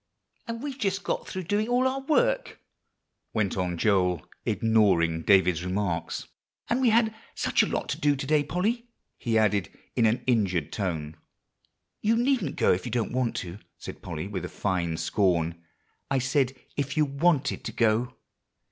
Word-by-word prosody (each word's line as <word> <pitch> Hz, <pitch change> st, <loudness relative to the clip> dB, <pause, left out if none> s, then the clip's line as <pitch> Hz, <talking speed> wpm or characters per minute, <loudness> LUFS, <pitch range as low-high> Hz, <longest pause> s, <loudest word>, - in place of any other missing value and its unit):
"And 230 Hz, +2 st, -5 dB
we've 280 Hz, -2 st, -5 dB
just 195 Hz, -3 st, -1 dB
got -, -, -2 dB
through 185 Hz, -, -4 dB
doing 205 Hz, +5 st, 0 dB
all 250 Hz, +2 st, +3 dB
our 265 Hz, +1 st, -1 dB
work," -, -, +1 dB, 0.8 s
went 105 Hz, -4 st, +1 dB
on 90 Hz, -2 st, -1 dB
Joel, 90 Hz, -3 st, +2 dB, 0.2 s
ignoring 95 Hz, -8 st, +3 dB
David's 90 Hz, -2 st, +4 dB
remarks; 90 Hz, -2 st, -2 dB, 0.4 s
"and 240 Hz, +3 st, +1 dB
we 250 Hz, -, +5 dB
had 220 Hz, 0 st, +3 dB, 0.2 s
such -, -, +2 dB
a -, -, +2 dB
lot -, -, -2 dB
to -, -, -2 dB
do 145 Hz, -1 st, +3 dB
to 135 Hz, 0 st, -4 dB
day 150 Hz, +1 st, +3 dB
Polly," 215 Hz, -, -1 dB, 0.3 s
he 115 Hz, -3 st, +1 dB
added 105 Hz, -5 st, +2 dB, 0.3 s
in 115 Hz, -, +4 dB
an 115 Hz, +3 st, 0 dB
injured 100 Hz, -, +1 dB
tone. 80 Hz, -6 st, -3 dB, 0.8 s
"You 220 Hz, +2 st, +3 dB
needn't 240 Hz, -, +1 dB
go -, -, +4 dB
if 90 Hz, -, -2 dB
you 125 Hz, -, -5 dB
don't 120 Hz, -2 st, -1 dB
want 125 Hz, -2 st, 0 dB
to," 90 Hz, +3 st, -8 dB, 0.2 s
said -, -, -9 dB
Polly, 85 Hz, 0 st, -5 dB
with 100 Hz, -1 st, -4 dB
a -, -, -4 dB
fine 85 Hz, -4 st, -1 dB
scorn; 85 Hz, -1 st, +1 dB, 0.5 s
"I 135 Hz, -, +2 dB
said 130 Hz, +1 st, +1 dB, 0.2 s
if 140 Hz, +1 st, -2 dB
you 155 Hz, -, +4 dB
wanted 145 Hz, +1 st, +1 dB
to -, -, -3 dB
go." 115 Hz, +2 st, +1 dB
115 Hz, 170 wpm, -27 LUFS, -, 0.8 s, we